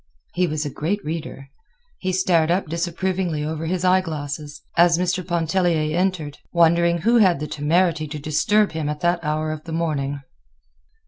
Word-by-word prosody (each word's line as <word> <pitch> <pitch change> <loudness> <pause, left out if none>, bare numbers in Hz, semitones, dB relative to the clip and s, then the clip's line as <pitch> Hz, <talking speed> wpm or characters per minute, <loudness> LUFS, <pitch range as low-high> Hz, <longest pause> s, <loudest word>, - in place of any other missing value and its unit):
He 180 0 +1
was 155 -1 -2
a 145 - -3
great 195 +9 -2
reader. 150 -3 -5 0.5
He 185 - -1
stared 175 -3 +2
up 180 +3 +1
disapprovingly 170 -1 -2
over 160 +1 -3
his 180 +1 -1
eye 185 +1 +5
glasses 145 -3 -6
as 170 0 +5
Mr. 180 +1 0
Pontellier 170 -2 0
entered, 175 -5 -1
wondering 170 0 +3
who 235 +6 +4
had 185 -9 +4
the 150 - -3
temerity 155 +2 +1
to 150 +1 -6
disturb 175 +8 +2
him 155 -2 -3
at 150 0 -4
that 175 0 +1
hour 155 +1 -1
of 155 0 -6
the 165 - -6
morning. 145 -4 -2
165 Hz, 170 wpm, -22 LUFS, 155-180 Hz, 0.5 s, eye